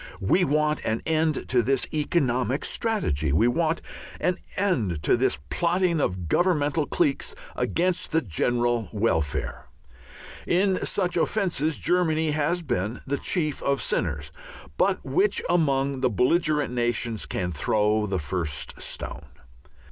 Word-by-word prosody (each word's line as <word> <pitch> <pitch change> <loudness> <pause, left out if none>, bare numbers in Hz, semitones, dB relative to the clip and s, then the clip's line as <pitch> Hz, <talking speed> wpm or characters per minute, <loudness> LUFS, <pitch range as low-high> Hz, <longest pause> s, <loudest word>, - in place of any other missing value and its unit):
We 185 - +3
want 150 -1 +1
an 110 +1 -1
end 160 -1 0
to 125 -2 +4
this 135 +3 +1
economic 135 -5 0
strategy, 80 - 0
we 110 - +4
want 160 +5 0 0.4
an 180 0 0 0.2
end 115 - 0
to - - +4
this - - +1
plotting 175 -1 +1
of 90 -6 -2
Governmental 150 - +1
cliques 295 -6 0 0.2
against 180 +1 0
the 160 -1 +2
general 120 - 0
welfare. 100 -9 -1 0.8
In 190 +1 +2
such 180 -3 0
offences 170 -5 0
Germany 160 -3 +1
has 155 +4 0
been 105 - -2
the 140 +1 -2
chief 155 -6 -1
of 140 0 +1
sinners, - - -2 0.4
but - - +1
which 400 +2 +2
among 140 -5 +1
the 130 - +3
belligerent 150 - +1
nations 120 -2 -1
can 90 -1 -2
throw 105 +7 +1
the 95 -1 -1
first 80 -1 -4
stone? - - -5
145 Hz, 130 wpm, -25 LUFS, 115-170 Hz, 0.8 s, to